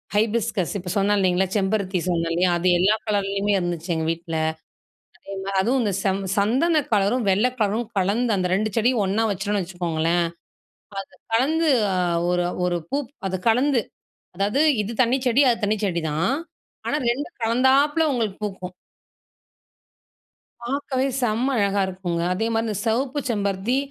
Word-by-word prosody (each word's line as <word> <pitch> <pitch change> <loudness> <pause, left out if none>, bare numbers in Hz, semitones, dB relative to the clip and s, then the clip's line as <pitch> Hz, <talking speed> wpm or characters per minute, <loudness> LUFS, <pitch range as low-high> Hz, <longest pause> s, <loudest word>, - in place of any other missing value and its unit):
Hibiscus 220 -3 0
இப்போ 180 0 -7
சொன்னேன் 205 +1 +2
இல்லைங்களா, 185 0 +2
செம்பருத்தி 195 -2 0
சொன்னேன் 165 -2 0
இல்லையா? 180 +2 +2
அது 175 +2 -1
எல்லா 200 +4 +4
கலர்லேயுமே 200 -1 0
இருந்துச்சு 175 -1 -4
எங்க 160 0 -1
வீட்ல. 165 0 -5 0.8
அதே 195 - -10
மாரி 195 0 -2
அதும் 240 +7 +1
இந்த 210 -3 0
ச - - -10 0.3
சந்தன 270 +11 +3
கலரும், 210 +5 +2
வெள்ள 195 +5 +3
கலரும் 215 +3 0
கலந்து 215 +5 +1
அந்த 180 -1 0
ரெண்டு 215 +3 0
செடியும் 235 0 +2
ஒண்ணா 205 +4 +1
வச்சுட்டோம்னு 200 +1 -1
வச்சுக்கோங்களேன், 170 -1 -1 0.9
அது - - -23 0.2
கலந்து 315 +7 +2 0.3
அ - - 0 0.3
ஒரு 180 0 +1 0.2
ஒரு 175 -1 0
பூ 280 - 0 0.3
அத 185 -1 -3
கலந்து 255 +1 +2 0.5
அதாவது 205 +9 +1 0.2
இது 210 - -5
தண்ணி 245 +2 +2
செடி 250 +3 +4
அது 230 -2 -3
தண்ணி 210 +1 +1
செடிதான். 165 - 0 0.5
ஆனா 295 - +1
ரெண்டும் 285 +8 -3
கலந்தாப்பல 265 +7 +3
உங்களுக்கு 220 -6 -2
பூக்கும். 185 -3 -6 1.9
பார்க்கவே 265 +1 -1
செம்ம 245 +3 +1
அழகா 200 -1 +2
இருக்குங்க. 180 -2 -3
அதே 215 +5 -1
மாரி 225 0 0
இந்த 215 - -2
சிவப்பு 255 +5 0
செம்பருத்தி, 200 +2 0
205 Hz, 145 wpm, -23 LUFS, 185-235 Hz, 1.9 s, எல்லா